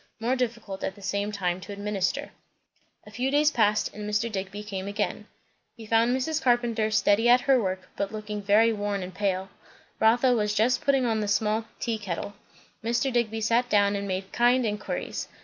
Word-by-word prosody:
More 240 +3 0
difficult 230 -6 -3
at 190 - -3
the 200 - -15
same 200 +2 -1
time 185 -3 -2
to 205 - -9
administer. 205 +6 -2 0.7
A 210 - -13
few 250 +5 -1
days 295 +2 +3
passed, 210 -4 +1
and 210 0 -6
Mr. 210 +2 0
Digby 195 0 -4
again 200 -1 -5
came. - - -2 0.5
He 225 - -10
found 230 +3 +3
Mrs. 310 +4 -1
Carpenter 240 -4 +2
steady 215 +2 +3
at 245 +1 +6
her 270 -2 +3
work, 185 -2 -3
but 200 0 -2
looking 210 -1 -5
very 215 +3 +4
worn 205 -2 -2
and 180 +1 -8
pale. 190 -1 -1 0.5
Rotha 240 +3 +4
was 210 -3 0
just 225 +4 +2
putting 270 -2 +2
on 225 -2 +1
the 210 - -2
small 215 +2 +1
tea 230 -2 -2
kettle. 200 0 -4 0.5
Mr. 240 +3 0
Digby 225 -2 0
sat 235 +3 +2
down 205 -1 +3
and 200 0 -3
made 190 0 -3
kind 245 +1 +3
inquiries. 210 -1 -3
215 Hz, 185 wpm, -26 LUFS, 200-240 Hz, 0.7 s, at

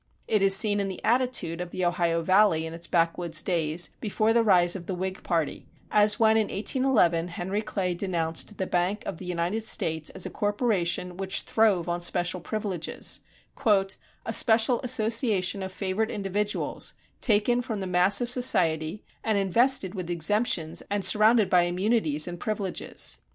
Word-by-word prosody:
It 215 -2 +1
is 195 0 +5
seen 205 0 +3
in 200 - -1
the 190 -2 -6
attitude 235 -8 0
of 180 - -6
the 185 +1 -3
Ohio 170 -1 0
Valley 185 -3 +3
in 160 - -7
its 170 +1 -4
backwoods 165 -1 0
days 165 -2 -1
before 215 +1 0
the 235 0 +3
rise 180 -4 +3
of 175 -3 -8
the 185 - -3
Whig 190 +2 -5
party, 165 -4 -2 0.2
as 210 0 +4
when 220 -1 +4
in 215 -2 +1
1811 205 - +1
Henry 185 +4 -4
Clay 190 -4 -2
denounced 175 +1 -1
the 190 - -2
Bank 180 +4 -1
of - - -5
the 185 - -9
United 180 +4 -2
States 160 -7 0
as - - -1
a - - -6
corporation 195 -5 -1
which 195 0 0
throve 205 -6 +1
on 175 0 -2
special 175 +1 0
privileges 200 -3 -2 0.5
"a 195 +2 -1
special 230 +2 +3
association 220 -5 +1
of 190 0 -5
favored 195 +3 -2
individuals 205 +1 -3 0.3
taken 235 +2 +2
from 225 -4 -5
the 190 - -4
mass 180 +4 +2
of 240 0 -2
society, 185 -8 +1 0.2
and 220 -2 0
invested 200 +1 +3
with 185 -4 -6
exemptions 175 -1 +1
and 200 -1 -1
surrounded 215 0 +4
by 180 - +4
immunities 175 -3 0
and 175 -1 -7
privileges." 200 -3 -1
190 Hz, 165 wpm, -26 LUFS, 175-215 Hz, 0.5 s, is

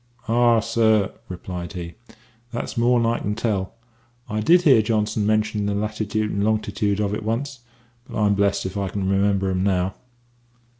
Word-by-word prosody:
"Ah, 120 -1 +4
sir," 110 -3 +2 0.2
replied 90 -1 -6
he, 85 -2 -6 0.6
"that's 120 - -4
more'n 120 0 +3
I 115 +1 +1
can 105 +1 -2
tell. 105 -3 -2 0.5
I 105 - -2
did 175 +11 +4
hear 135 -9 +6
Johnson 105 -1 0
mention 110 -1 +1
the 100 - -1
latitude 105 0 -2
and 100 - -1
longitude 105 -1 0
of 105 -1 0
it 105 - -3
once; 120 +5 -3 0.5
but - - -6
I'm 105 -1 +3
blest 100 0 +1
if 95 - -4
I 100 -1 -2
can 95 0 -3
remember 100 0 +1
'em 90 0 -1
now." 95 -1 +1
105 Hz, 165 wpm, -23 LUFS, 100-110 Hz, 0.6 s, hear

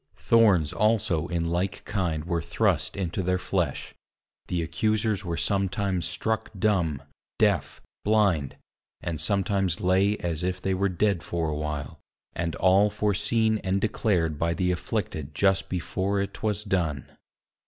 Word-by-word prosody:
Thorns 100 -10 +4
also 105 -7 +1
in 85 -1 -1
like 90 +3 -2
kind 85 -6 -1
were 85 -1 -1
thrust - - 0
into 95 -1 -2
their 90 0 +1
flesh; 90 -6 -2 0.5
the 85 -2 -1
accusers 105 +5 0
were 85 -2 -3
sometimes 95 -2 0
struck 110 0 -2
dumb, 85 -9 +1 0.3
deaf, - - +1 0.2
blind, 100 -10 +2 0.5
and 80 -3 -3
sometimes 95 0 +1
lay 95 +3 +2
as 85 -2 -3
if 90 0 -1
they 95 +1 -1
were 100 +1 +1
dead 95 0 +1
for 80 +1 -2
a 75 - -2
while, 75 -3 -4 0.3
and 85 -1 -2
all 95 +3 +4
foreseen 105 +2 +1
and 95 0 0
declared 90 -7 0
by 85 0 +1
the 90 +1 +1
afflicted 80 -4 -3
just 95 +2 +2
before 95 +3 -1
it 100 0 -2
'twas 105 -1 -2
done. 85 - -1
95 Hz, 145 wpm, -26 LUFS, 85-100 Hz, 0.5 s, Thorns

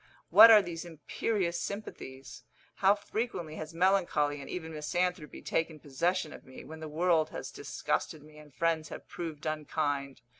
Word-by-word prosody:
What 230 - +11
are 215 -2 +9
these 170 -2 -5
imperious 175 +3 -2
sympathies? 135 - -7 0.3
How 195 +1 +5
frequently 205 -6 -4
has 155 -1 -6
melancholy 165 -5 +2
and - - -9
even 160 -2 -5
misanthropy 175 +1 -2
taken 165 -1 -1
possession 155 +3 -1
of - - -12
me, 130 - -12
when 160 0 -10
the 160 - -6
world 160 0 +2
has - - -6
disgusted 150 - -3
me, 150 0 -15
and 150 -1 -15
friends 160 +1 0
have - - -9
proved 160 -3 -6
unkind. 145 -3 -2
160 Hz, 155 wpm, -31 LUFS, 150-180 Hz, 0.3 s, What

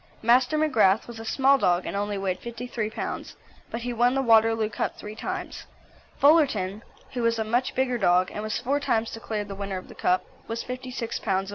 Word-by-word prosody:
Master 245 +5 +4
McGrath 225 -10 +3
was 235 -2 -9
a 225 - -7
small 270 +3 +3
dog, 180 -3 +2
and - - -4
only 205 0 -1
weighed 190 -2 -2
53 235 -2 -4
lbs., - - -5 0.3
but 230 - -4
he 245 +1 -3
won 245 +2 +3
the 270 - +1
Waterloo 225 -2 +4
Cup 215 - -3
three 210 - -8
times. 370 +9 -5 0.5
Fullerton, 255 - +3 0.3
who 250 - -2
was 230 0 +2
a 220 - 0
much 240 +4 0
bigger 250 -2 +1
dog, 180 -1 +3
and 210 - -5
was 215 0 -2
four 280 +3 0
times 225 -5 0
declared 215 -2 -4
the 200 - -6
winner 195 -1 -4
of 185 - -9
the - - -10
Cup, 180 +1 +1 0.2
was 230 +1 -3
56 250 -2 -5
lbs. 195 -1 -1
225 Hz, 205 wpm, -26 LUFS, 205-250 Hz, 0.5 s, Master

